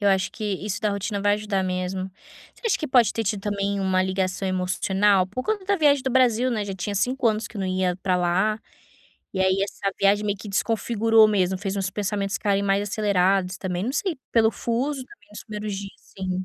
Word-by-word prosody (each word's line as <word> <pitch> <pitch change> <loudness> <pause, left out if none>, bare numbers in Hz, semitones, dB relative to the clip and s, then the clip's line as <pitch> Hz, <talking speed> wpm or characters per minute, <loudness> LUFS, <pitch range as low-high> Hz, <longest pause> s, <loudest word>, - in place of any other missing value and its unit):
Eu 205 - +3
acho 190 -2 +2
que 215 - -6 0.2
isso 205 0 -3
da 210 -1 +1
rotina 200 0 -3
vai 205 0 +3
ajudar 205 -2 -1
mesmo. 185 +1 -3 0.4
Você - - -23
acha 425 - +2
que 310 - -3
pode 245 -5 +4
ter 225 - -1
tido 200 -1 -1
também 200 -1 -1
uma 185 -1 +2
ligação 190 0 -1
emocional? 190 +1 +2
Por 230 +7 -5
conta 420 -3 -1
da 400 +1 +1
viagem 285 -4 +4
do 265 - -1
Brasil 255 -1 +3
né, 215 -4 -1
já 195 -1 -5
tinha 200 +3 -4
5 250 +4 0
anos 215 0 -1
que 215 - -12
não 190 -1 -2
ia 185 -1 0
pra 185 -2 +2
lá, 185 +5 +1 0.7
e 190 - -2
aí, 190 +1 +2
essa 195 0 -3
viagem 205 +1 +3
meio 205 -1 -1
que 210 - -9
desconfigurou 225 +1 +3
mesmo 190 -2 +1
fez 195 0 -3
uns 190 -1 -1
pensamentos 200 -1 -2
ficarem 200 -1 +1
mais 200 0 +2
acelerados 195 -2 +1
também, 180 0 -3
não 255 - -2
sei 350 0 -1 0.2
pelo 220 -1 +4
fuso 255 +4 -2
também 410 - -19
nos - - -8
primeiros 210 -2 -5
dias, 195 0 -8 0.2
assim. 190 -1 -3
200 Hz, 215 wpm, -24 LUFS, 190-220 Hz, 0.7 s, pode